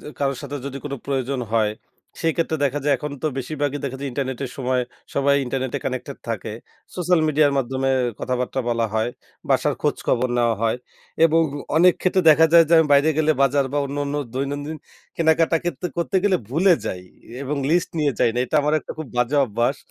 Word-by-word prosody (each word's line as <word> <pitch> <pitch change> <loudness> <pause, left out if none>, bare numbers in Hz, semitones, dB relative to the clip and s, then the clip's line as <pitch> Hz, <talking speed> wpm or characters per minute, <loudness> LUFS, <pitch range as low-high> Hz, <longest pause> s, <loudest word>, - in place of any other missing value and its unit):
যে - - -13
কারো 140 -1 0
সাথে 145 +1 -5
যদি 140 0 -5
কোনো 140 -1 -4
প্রয়োজন 135 -1 -1
হয় 110 -2 +2 0.5
সেই 165 -1 +1
ক্ষেত্রে 160 -1 0
দেখা 140 +1 0
যায় 145 - +3
এখন 145 +3 -6
তো 155 - +1
বেশির 135 +4 -4
ভাগই 145 0 0
দেখা 135 -1 -3
যায় 140 - -3
ইন্টারনেটের 130 -1 -3
সময় 130 -1 0 0.3
সবাই 140 0 +3
ইন্টারনেটে 130 0 -2
কানেক্টেড 130 +2 -4
থাকে। 110 -1 -3 0.4
সোশ্যাল 180 -2 +2
মিডিয়ার 150 -1 +3
মাধ্যমে 135 +1 -1 0.3
কথাবার্তা 125 +1 -2
বলা 115 -1 +1
হয়. 110 +2 +1 0.4
বাসার - - +2
খোঁজখবর 125 +1 0
নেওয়া 120 -1 +2
হয় 115 +1 +1 0.5
এবং 165 0 +4 0.3
অনেক 180 +2 +6
ক্ষেত্রে 185 0 +2
দেখা 160 +1 +6
যায় 170 -1 +8
যে - - 0
আমি 160 - +4
বাইরে 145 +3 +5
গেলে 155 0 +3
বাজার 140 0 +3
বা 145 - +1
অন্যান্য 140 +1 -3 0.2
দৈনন্দিন 145 +3 -3 0.4
কেনাকাটা 165 0 +3
কিন্তু 175 +1 -2
করতে 170 +3 0
গেলে 195 -2 +4
ভুলে 175 +6 +4
যাই 90 -3 -4 0.4
এবং 140 +2 -2
লিস্ট 175 +1 +2
নিয়ে 145 -3 +2
যাই - - +3
না। - - -1
এটা 155 - -1
আমার 150 +1 +1
একটা - - -8
খুব 155 - -5
বাজে 125 +4 +1
অভ্যাস। 120 +3 0
140 Hz, 190 wpm, -22 LUFS, 130-155 Hz, 0.5 s, যায়